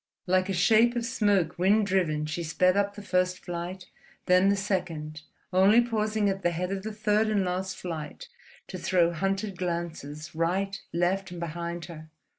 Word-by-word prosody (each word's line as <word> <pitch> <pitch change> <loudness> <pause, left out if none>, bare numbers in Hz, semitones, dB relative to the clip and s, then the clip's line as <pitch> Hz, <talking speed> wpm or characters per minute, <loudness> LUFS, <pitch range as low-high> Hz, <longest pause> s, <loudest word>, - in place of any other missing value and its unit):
Like 185 +1 +2
a - - 0
shape 225 +6 +4
of 235 -1 -1
smoke 205 -9 +1
wind 205 +4 +4
driven, 170 -6 0
she 155 +3 -3
sped 180 +3 +2
up 200 0 0
the 205 - -9
first 185 -2 +1
flight, 175 +1 -6 0.4
then 185 +2 +5
the 200 - +3
second, 165 -6 -3 0.3
only 195 +5 +6
pausing 220 -3 0
at 195 0 -1
the 175 - +2
head 180 +2 -3
of 195 -1 -2
the 220 +2 -5
third 215 0 +1
and 205 -3 +1
last 185 +1 -3
flight 170 - -6 0.4
to - - -6
throw 175 -2 +2
hunted 195 +2 -2
glances 165 -4 -4
right, 190 +4 -1
left, 185 +3 0
and 175 -1 -8
behind 170 0 -4
her. 160 -2 -10
185 Hz, 175 wpm, -27 LUFS, 170-200 Hz, 0.4 s, only